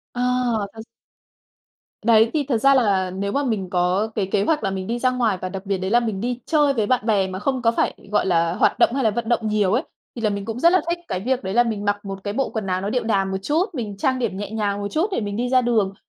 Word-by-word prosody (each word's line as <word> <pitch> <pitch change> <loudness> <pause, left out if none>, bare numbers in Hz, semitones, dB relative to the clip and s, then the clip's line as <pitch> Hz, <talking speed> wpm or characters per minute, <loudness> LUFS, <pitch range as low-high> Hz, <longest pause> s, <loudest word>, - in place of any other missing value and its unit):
Ờ 245 - -2 0.5
thật 220 0 -10 1.2
Đấy, 225 0 +5
thì 295 -3 0
thật 235 - +2
ra 275 +4 +4
là 195 -7 +2
nếu 200 +2 -3
mà 285 +1 0
mình 205 -8 -2
có 180 +4 +1
cái 205 - 0
kế 200 - +2
hoạch 300 -2 0
là 195 - 0
mình 190 -1 -4
đi 240 +1 -2
ra 255 0 +2
ngoài 230 -6 0
và 185 - -3
đặc 195 +1 -7
biệt 195 -1 0
đấy 190 +2 -3
là 240 - +5
mình 215 -4 -3
đi 245 0 -2
chơi 295 -3 +3
với 220 -4 0
bạn 245 -1 +1
bè 200 -4 +2
mà 185 0 -5
không 260 +4 -1
có 230 -1 +3
phải, - - 0 0.2
gọi - - +2
là, 170 -2 +2
hoạt - - +2
động 235 - +4
hay 270 - 0
là 220 - +3
vận 235 +1 -3
động 230 -2 +1
nhiều 210 -2 +1
ấy, 260 +7 +1 0.3
thì 235 - -6
là 215 - +2
mình 200 -1 -4
cũng 230 +1 -4
rất 340 +4 +5
là 370 - +4
thích 345 0 -1
cái 185 - -2
việc 255 +5 -1
đấy 190 +1 -3
là 240 - +5
mình 215 -3 -3
mặc 205 0 -1
một 195 -1 -6
cái 205 0 -3
bộ 270 +3 -1
quần 215 -4 -4
áo 185 0 -1
nó 200 - -2
điệu 245 +1 -1
đà 200 -4 +1
một 190 0 -2
chút, 315 - +1
mình 210 -7 -5
trang 260 +4 0
điểm 195 -5 -2
nhẹ 205 0 -5
nhàng 205 -2 -1
một 200 - -2
chút 325 +6 +1
để 305 - -1
mình 205 -1 -4
đi 245 +1 -1
ra 255 -1 +4
đường. 220 -5 +1
220 Hz, 295 wpm, -22 LUFS, 195-245 Hz, 1.2 s, Đấy